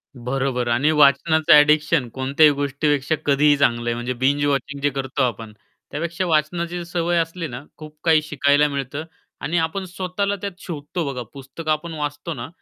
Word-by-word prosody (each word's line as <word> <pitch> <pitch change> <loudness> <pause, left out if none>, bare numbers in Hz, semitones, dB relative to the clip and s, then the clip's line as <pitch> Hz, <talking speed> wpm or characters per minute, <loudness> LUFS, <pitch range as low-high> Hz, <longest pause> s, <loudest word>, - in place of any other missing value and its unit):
बरोबर. 125 0 -2
आणि 125 +6 +2
वाचनाचं 155 +2 +4
ॲडिक्शन 150 -1 +4
कोणत्याही 135 +5 +3
गोष्टीपेक्षा 145 +1 0
कधीही 145 +1 +4
चांगलं 120 -4 +1
आहे, - - +1
म्हणजे 120 +2 -3
बिंज 140 +4 +1
वॉचिंग 140 0 -2
जे 145 - +2
करतो 135 0 -3
आपण, 115 -3 -3 0.4
त्यापेक्षा 170 +4 -3
वाचनाची 170 +2 -1
सवय 175 0 -1
असली 165 +1 -2
ना, 120 +1 -8
खूप 155 0 -11
काही 160 -2 +4
शिकायला 145 -1 +2
मिळतं 140 +1 -4 0.4
आणि 170 +4 -1
आपण 190 +4 -5
स्वतःला 185 +2 -2
त्यात 195 -3 -6
शोधतो 160 0 -5
बघा. 125 -2 -5
पुस्तक 140 +4 -10
आपण 155 +2 -1
वाचतो 150 +1 -4
ना, 120 -5 -7
145 Hz, 160 wpm, -22 LUFS, 135-165 Hz, 0.4 s, वाचनाचं